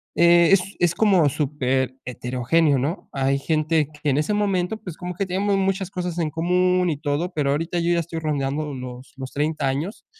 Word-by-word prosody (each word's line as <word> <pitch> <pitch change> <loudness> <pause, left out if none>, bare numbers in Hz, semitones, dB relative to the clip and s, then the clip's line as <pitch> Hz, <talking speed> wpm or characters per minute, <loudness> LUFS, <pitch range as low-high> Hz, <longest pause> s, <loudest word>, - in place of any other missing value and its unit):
eh 170 +1 +5
es 195 - +6 0.2
es 175 -1 +3
como 190 -8 +4
súper 135 -3 -1
heterogéneo, 130 +5 +1
¿no?, 150 +9 -3
hay 135 0 +1
gente 155 0 +1
que 150 -1 -3
en 135 - +1
ese 155 +8 0
momento, 200 -1 0
pues 180 -6 -7
como 180 0 -6
que 195 - -1
teníamos 195 +2 0
muchas 190 -1 0
cosas 180 -2 -4
en 160 -2 0
común 180 +2 +2
y 155 - -1
todo, 155 +4 -2
pero 145 -4 0
ahorita 165 +4 -1
yo 170 +1 +1
ya 170 - +2
estoy 165 0 -5
rondando 150 -1 -2
los 125 0 -9
los 130 -1 -6
30 150 -1 -1
años, 150 - -3
160 Hz, 195 wpm, -23 LUFS, 140-180 Hz, 0.2 s, es